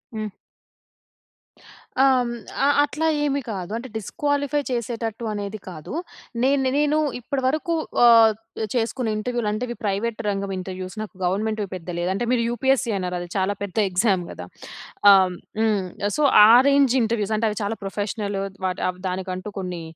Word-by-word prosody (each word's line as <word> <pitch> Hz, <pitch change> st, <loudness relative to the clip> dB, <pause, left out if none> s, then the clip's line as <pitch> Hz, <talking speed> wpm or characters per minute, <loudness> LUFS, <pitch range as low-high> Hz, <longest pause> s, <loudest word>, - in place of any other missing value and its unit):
హ్మ్. 215 Hz, -1 st, -4 dB, 1.7 s
ఆహ్, 270 Hz, -, +6 dB
హ్మ్ 245 Hz, -1 st, -1 dB, 0.4 s
ఆహ్, 285 Hz, -, +4 dB
అట్లా 305 Hz, +2 st, -1 dB, 0.2 s
ఏమి 280 Hz, -1 st, 0 dB
కాదు 190 Hz, -2 st, -5 dB
అంటే 250 Hz, +3 st, -7 dB
డిస్క్వాలిఫై 285 Hz, -, -1 dB
చేసేటట్టు 230 Hz, -1 st, -3 dB
అనేది 205 Hz, 0 st, -5 dB
కాదు. 155 Hz, -, -8 dB, 0.5 s
నేను 265 Hz, 0 st, +3 dB
నేను 295 Hz, +1 st, +2 dB, 0.2 s
ఇప్పటి 265 Hz, +3 st, -3 dB
వరకు 310 Hz, +4 st, 0 dB, 0.3 s
ఆహ్, 230 Hz, -2 st, +7 dB, 0.4 s
చేసుకున్న 235 Hz, 0 st, -1 dB
ఇంటర్వ్యూలు 240 Hz, 0 st, -2 dB
అంటే 215 Hz, +3 st, -3 dB
ఇవి 240 Hz, -, -5 dB
ప్రైవేట్ 215 Hz, +3 st, -1 dB
రంగం 200 Hz, -1 st, -1 dB
ఇంటర్వ్యూస్ 185 Hz, 0 st, -6 dB
నాకు 215 Hz, -, -7 dB
గవర్నమెంట్‌వి 210 Hz, +3 st, -1 dB
పెద్ద 180 Hz, -1 st, -8 dB
లేదు. 175 Hz, +1 st, -1 dB
అంటే 220 Hz, +5 st, -2 dB
మీరు 250 Hz, -2 st, +2 dB
యూపీఎస్సీ 260 Hz, +1 st, +1 dB
అన్నారు. 180 Hz, -1 st, -3 dB
అది 175 Hz, -, -6 dB
చాలా 190 Hz, +1 st, +1 dB
పెద్ద 200 Hz, -1 st, -7 dB
ఎగ్జామ్ 185 Hz, -1 st, +2 dB
గదా! -, -, -8 dB, 0.7 s
ఆహ్, 185 Hz, -2 st, +5 dB, 0.2 s
హ్మ్. 215 Hz, -3 st, +2 dB, 0.3 s
సొ 300 Hz, -, +1 dB, 0.2 s
ఆ 215 Hz, -, +7 dB, 0.2 s
రేంజ్ 280 Hz, -3 st, +4 dB
ఇంటర్వ్యూస్ 220 Hz, -2 st, 0 dB
అంటే 225 Hz, -, 0 dB
అవి 210 Hz, -, -5 dB
చాలా 205 Hz, +2 st, -2 dB
ప్రొఫెషనల్ 205 Hz, +1 st, -3 dB, 0.3 s
వాట్ 185 Hz, 0 st, -2 dB
ఆవ్ 180 Hz, 0 st, -3 dB
దానికంటూ 185 Hz, +1 st, -4 dB
కొన్ని 180 Hz, -2 st, -4 dB
215 Hz, 155 wpm, -23 LUFS, 195-250 Hz, 1.7 s, ఆహ్